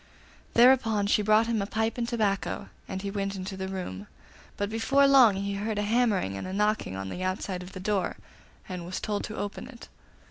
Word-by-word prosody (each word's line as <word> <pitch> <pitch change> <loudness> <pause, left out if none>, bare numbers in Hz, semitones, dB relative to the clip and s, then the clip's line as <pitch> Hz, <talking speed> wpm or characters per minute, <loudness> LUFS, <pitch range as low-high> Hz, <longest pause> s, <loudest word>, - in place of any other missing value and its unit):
Thereupon 235 -4 +5
she 210 +1 +3
brought 215 +2 +4
him 230 -2 0
a 200 - -2
pipe 220 +1 -1
and 235 -1 -2
tobacco, 210 -5 -1 0.2
and 190 0 -5
he 200 - -3
went 195 -1 -2
into 190 +1 -5
the 190 0 -4
room; 140 - -5 0.5
but 205 - -1
before 230 +6 +3
long 260 -7 +7
he 200 +1 -2
heard 210 +2 -2
a 205 - 0
hammering 210 - +1
and 185 - -4
knocking 210 - 0
on 95 0 -5
the 180 - -6
outside 185 0 -2
of 180 +1 -10
the 185 - -7
door, 195 -1 -1 0.5
and 180 -2 -5
was 180 +2 -4
told 205 -1 -2
to 215 - -7
open 205 0 -5
it. 240 -3 -12
205 Hz, 205 wpm, -28 LUFS, 190-220 Hz, 0.5 s, long